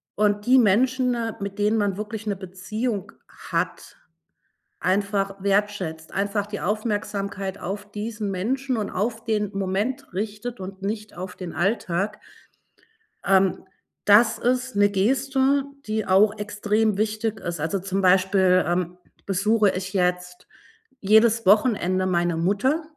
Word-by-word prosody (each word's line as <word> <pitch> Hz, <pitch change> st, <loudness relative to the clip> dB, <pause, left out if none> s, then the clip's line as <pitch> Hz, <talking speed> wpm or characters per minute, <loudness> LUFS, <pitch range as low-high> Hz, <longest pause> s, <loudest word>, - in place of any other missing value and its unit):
und 205 Hz, 0 st, +1 dB
die 255 Hz, +2 st, +6 dB
Menschen, 250 Hz, +3 st, +3 dB, 0.2 s
mit 200 Hz, 0 st, -6 dB
denen 210 Hz, +2 st, +2 dB
man 200 Hz, -3 st, 0 dB
wirklich 210 Hz, +1 st, -5 dB
'ne 205 Hz, -, 0 dB
Beziehung 195 Hz, +3 st, -4 dB, 0.4 s
hat, -, -, -3 dB, 0.8 s
einfach 195 Hz, +1 st, 0 dB
wertschätzt, 195 Hz, -5 st, -1 dB
einfach 200 Hz, +1 st, -1 dB
die 210 Hz, -1 st, -6 dB
Aufmerksamkeit 200 Hz, -2 st, -2 dB
auf 200 Hz, +3 st, -6 dB
diesen 210 Hz, 0 st, -4 dB
Menschen 255 Hz, +8 st, -1 dB
und 215 Hz, -2 st, -3 dB
auf 225 Hz, +4 st, -2 dB
den 210 Hz, -3 st, 0 dB
Moment 200 Hz, +8 st, -2 dB
richtet 215 Hz, +4 st, -4 dB
und 190 Hz, +1 st, -8 dB
nicht 215 Hz, +1 st, -4 dB
auf 180 Hz, +1 st, -6 dB
den 180 Hz, -3 st, -7 dB
Alltag 195 Hz, +3 st, -1 dB, 1.1 s
ähm, 190 Hz, -1 st, +3 dB, 0.4 s
das 220 Hz, +3 st, +6 dB
ist 255 Hz, 0 st, 0 dB
'ne 205 Hz, 0 st, +4 dB
Geste, 265 Hz, +7 st, +2 dB, 0.2 s
die 215 Hz, 0 st, -2 dB
auch 205 Hz, +3 st, +4 dB
extrem 210 Hz, 0 st, 0 dB
wichtig 215 Hz, +1 st, -1 dB
ist. 170 Hz, -1 st, -5 dB
Also, 160 Hz, +6 st, -1 dB
zum 195 Hz, +1 st, -2 dB
Beispiel, 185 Hz, 0 st, +4 dB
ähm, 175 Hz, 0 st, -1 dB, 0.3 s
besuche 205 Hz, +2 st, +2 dB
ich 190 Hz, +2 st, -5 dB
jetzt 180 Hz, -1 st, -1 dB, 0.5 s
jedes 220 Hz, +2 st, +4 dB
Wochenende 195 Hz, -3 st, +3 dB
meine 175 Hz, -2 st, +1 dB
Mutter 205 Hz, -, +1 dB
205 Hz, 130 wpm, -24 LUFS, 190-220 Hz, 1.1 s, die